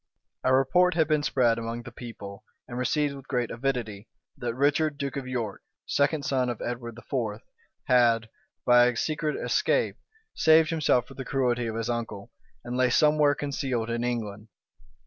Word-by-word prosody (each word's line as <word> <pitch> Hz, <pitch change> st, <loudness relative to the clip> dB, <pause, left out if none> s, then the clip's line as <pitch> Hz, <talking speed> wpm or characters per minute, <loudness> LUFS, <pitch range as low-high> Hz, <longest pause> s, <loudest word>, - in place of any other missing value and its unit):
A 130 Hz, -, +2 dB
report 160 Hz, +8 st, +4 dB
had 160 Hz, -3 st, +3 dB
been 155 Hz, -1 st, +2 dB
spread 120 Hz, -5 st, +2 dB
among 115 Hz, +1 st, -5 dB
the 120 Hz, -, -9 dB
people, 105 Hz, -5 st, -9 dB, 0.2 s
and 120 Hz, -, -7 dB
received, 140 Hz, +4 st, 0 dB
with 135 Hz, -1 st, -11 dB
great 125 Hz, -3 st, -1 dB
avidity, 115 Hz, -5 st, -3 dB, 0.3 s
that 120 Hz, -1 st, -4 dB
Richard, 145 Hz, +2 st, +1 dB
duke 140 Hz, -1 st, -3 dB
of 135 Hz, -2 st, -4 dB
York, 115 Hz, -6 st, -3 dB, 0.2 s
second 145 Hz, +1 st, +1 dB
son 130 Hz, -2 st, +1 dB
of 120 Hz, -, -4 dB
Edward 120 Hz, -1 st, -5 dB
IV., 115 Hz, -3 st, -3 dB, 0.4 s
had, 115 Hz, -2 st, +3 dB, 0.4 s
by 125 Hz, 0 st, +6 dB
a 125 Hz, -2 st, -1 dB
secret 155 Hz, +1 st, -1 dB
escape, -, -, +1 dB, 0.4 s
saved 160 Hz, 0 st, +5 dB
himself 145 Hz, -7 st, +2 dB
from 135 Hz, -, -14 dB
the 135 Hz, -, -4 dB
cruelty 125 Hz, -3 st, 0 dB
of 110 Hz, -, -4 dB
his 115 Hz, 0 st, -2 dB
uncle, 115 Hz, -4 st, -4 dB, 0.3 s
and 120 Hz, +1 st, -5 dB
lay 130 Hz, -1 st, +3 dB
somewhere 150 Hz, +2 st, +4 dB
concealed 135 Hz, -5 st, -2 dB
in 120 Hz, 0 st, -1 dB
England. 110 Hz, -3 st, -3 dB
125 Hz, 165 wpm, -27 LUFS, 115-140 Hz, 0.4 s, by